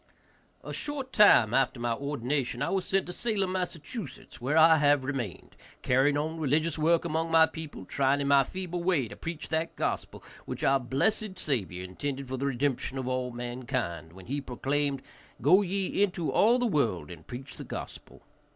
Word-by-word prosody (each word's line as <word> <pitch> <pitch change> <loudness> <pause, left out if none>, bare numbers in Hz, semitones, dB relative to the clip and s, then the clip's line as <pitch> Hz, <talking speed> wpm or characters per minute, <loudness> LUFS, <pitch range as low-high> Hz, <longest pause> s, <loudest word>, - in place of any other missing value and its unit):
A - - -6
short 275 -3 -5
time 120 - +6
after 130 -1 +2
my 120 -1 0
ordination 140 -1 -2
I - - -1
was 190 -2 0
sent 195 -1 +1
to 180 - -6
Salem, 200 -3 -1
Mass., 185 -2 -2 0.6
where 135 +6 0
I 160 0 +7
have 145 -2 +3
remained, 130 -8 -5 0.3
carrying 135 +3 +3
on 160 +2 -2
religious 155 +2 +1
work 165 +2 +2
among 165 0 -1
my 165 0 +6
people, 160 - -8
trying 135 +6 +1
in 140 - -1
my 140 -1 +6
feeble 180 +2 -5
way 170 -9 +2
to 105 - -9
preach 165 +4 -6
that 160 +1 -1
gospel - - -3 0.2
which - - -5
our 135 0 +4
blessed 190 - 0
Saviour 100 - -2
intended 135 +9 -5
for 130 +1 -4
the 140 +2 -1
redemption 135 0 -1
of 130 -1 -3
all 130 0 -1
mankind, 120 - -4
when 95 0 -12
he 140 +3 -3
proclaimed, 140 +1 -1 0.4
"Go 180 +8 +5
ye 195 0 -1
into 180 -5 +1
all 230 +4 +4
the 245 - 0
world 110 - 0
and 80 -2 -12
preach 130 +3 -8
the - - -6
gospel." - - -8
145 Hz, 180 wpm, -29 LUFS, 125-170 Hz, 0.6 s, I